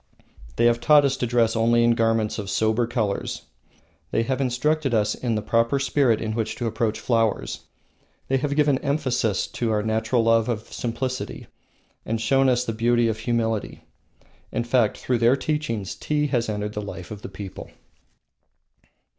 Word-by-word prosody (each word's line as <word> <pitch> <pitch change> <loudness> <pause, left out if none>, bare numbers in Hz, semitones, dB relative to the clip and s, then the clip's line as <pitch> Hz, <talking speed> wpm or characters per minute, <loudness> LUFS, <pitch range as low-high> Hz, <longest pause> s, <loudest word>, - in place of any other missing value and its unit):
They - - +2
have 120 0 +3
taught 150 +1 +6
us 135 -1 +1
to 125 - -1
dress 115 -1 +2
only 115 +1 +3
in 120 - +4
garments 115 -2 +1
of 100 -2 -5
sober 110 +3 +1
colors. 110 -5 -2 0.7
They 115 - +1
have 130 +3 -1
instructed 135 +1 0
us 105 -1 +2
in 120 -3 -2
the 105 - -2
proper 115 +3 +2
spirit 140 -4 +2
in 110 -1 -3
which 115 -1 -2
to 120 - -4
approach 110 -1 -1
flowers. 115 -2 -1 0.6
They 135 - +2
have 140 +2 -1
given 145 -3 +3
emphasis 130 -8 0
to 120 - -2
our 105 -1 +1
natural 110 +2 +1
love 115 0 +3
of 110 -2 -4
simplicity, 130 +2 -4 0.6
and 115 0 -2
shown 135 +4 +3
us 125 0 +1
the 115 - -2
beauty 120 +1 +2
of 110 0 -3
humility. 115 -2 -2 0.7
In 120 - -1
fact, 120 -2 +2
through 125 -2 -1
their 120 +3 +4
teachings 135 -8 -2
tea 150 -1 -1
has 120 -4 0
entered 105 0 -3
the 105 - -3
life 95 -2 -8
of 105 -1 -7
the - - -7
people. 95 -1 -8
115 Hz, 170 wpm, -24 LUFS, 110-130 Hz, 0.7 s, taught